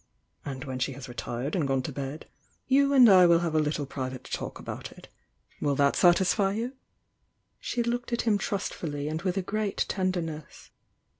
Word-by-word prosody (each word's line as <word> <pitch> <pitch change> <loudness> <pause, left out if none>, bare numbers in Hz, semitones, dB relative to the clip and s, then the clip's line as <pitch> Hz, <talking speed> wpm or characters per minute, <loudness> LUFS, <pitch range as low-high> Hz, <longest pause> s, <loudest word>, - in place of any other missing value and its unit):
And 135 -2 -6
when 130 -2 -5
she 135 +2 -1
has 135 0 -9
retired 120 - -4
and 160 -6 0
gone 135 -1 0
to - - -4
bed, 140 +2 -6 0.4
you 275 +1 +3
and 260 -4 +8
I 185 -4 +8
will 170 0 +5
have 170 -2 -1
a 155 - +3
Uttle 150 -2 -1
private 130 -2 -5
talk - - -5
about - - -7
it. - - -15 0.5
Will 145 -1 +1
that 140 0 +3
satisfy 190 +3 +4
you?" 235 +5 -3 0.9
She 240 - -2
looked. 240 +1 -2
him 215 -3 +2
trustfully 150 -7 -3
and 155 +1 -3
with 185 0 -1
a 195 - 0
great 210 +1 -1
tenderness. 175 -6 -3
165 Hz, 175 wpm, -28 LUFS, 140-200 Hz, 0.9 s, and